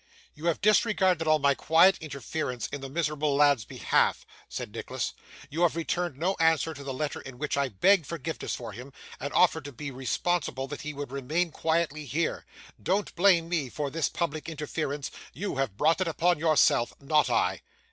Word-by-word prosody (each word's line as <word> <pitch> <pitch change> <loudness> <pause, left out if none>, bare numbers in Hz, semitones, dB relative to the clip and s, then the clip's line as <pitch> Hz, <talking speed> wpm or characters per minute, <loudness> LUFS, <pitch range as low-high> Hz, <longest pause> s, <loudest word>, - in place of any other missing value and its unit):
'You 155 +3 -5
have 170 - +1
disregarded 195 -5 +3
all 155 0 +5
my 140 -1 +3
quiet 165 +7 +4
interference 140 -3 -4
in 145 - -6
the 135 - -6
miserable 150 -1 0
lad's 140 -6 +4
behalf,' - - +1 0.2
said - - -6
Nicholas; - - -4 0.4
'you 160 +4 -2
have 175 -2 +3
returned 170 -2 -2
no 180 +6 0
answer 160 0 +3
to 140 -1 -9
the 135 - -4
letter 145 +3 -3
in 135 -2 -10
which 150 +2 -2
I 140 -1 +1
begged 170 - +3
forgiveness 160 -1 -4
for 115 -3 -7
him, 125 +6 -10 0.3
and 140 +2 -4
offered 160 -3 +4
to 145 - -6
be 140 +3 -6
responsible 135 +2 -1
that 145 - -6
he 150 - -4
would 145 -2 -6
remain 155 +6 -1
quietly 160 -2 -1
here. 155 +5 -2 0.3
Don't 195 +3 0
blame 175 -2 +4
me 160 -6 -1
for 145 +2 -3
this 165 +1 0
public 160 -2 -3
interference. 150 -2 -4 0.2
You 195 -3 -4
have 130 -8 -1
brought 160 +7 +3
it 185 - +1
upon 170 +1 +1
yourself; 155 -6 +3
not 150 +2 +2
I. 395 +3 +1
155 Hz, 185 wpm, -28 LUFS, 140-170 Hz, 0.4 s, all